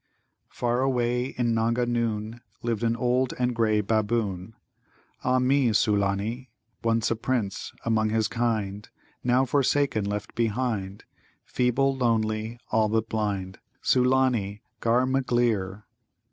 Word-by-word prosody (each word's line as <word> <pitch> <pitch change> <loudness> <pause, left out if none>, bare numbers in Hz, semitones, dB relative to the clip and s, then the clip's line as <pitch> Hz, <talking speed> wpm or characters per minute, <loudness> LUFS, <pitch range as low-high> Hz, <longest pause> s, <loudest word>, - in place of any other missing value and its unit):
"Far 120 +1 -1
away 125 -2 +1
in 120 -3 -1
Nanga 115 +2 +1
noon 115 -1 -2 0.2
Lived 115 -3 -1
an 115 -1 +1
old 125 +2 +1
and 125 0 0
grey 110 -2 +2
Baboon, 105 -2 -1 0.7
Ah 130 0 +2
mi, 130 0 +3
Sulâni! 105 +3 +1 0.4
Once 115 0 +1
a - - +2
Prince 115 -4 -2
among 110 -1 +2
his 110 0 +1
kind, 110 -4 -2 0.3
Now 125 +2 +3
forsaken, 140 -4 +1
left 105 0 -4
behind, 110 -4 -2 0.4
Feeble, 135 +2 +1
lonely, 110 -2 0
all 110 -1 +3
but 110 +1 0
blind: 100 -4 -2 0.2
Sulâni, 125 -5 +2 0.2
ghar 120 +2 +2
magleer. 120 -7 0
115 Hz, 120 wpm, -26 LUFS, 105-125 Hz, 0.7 s, mi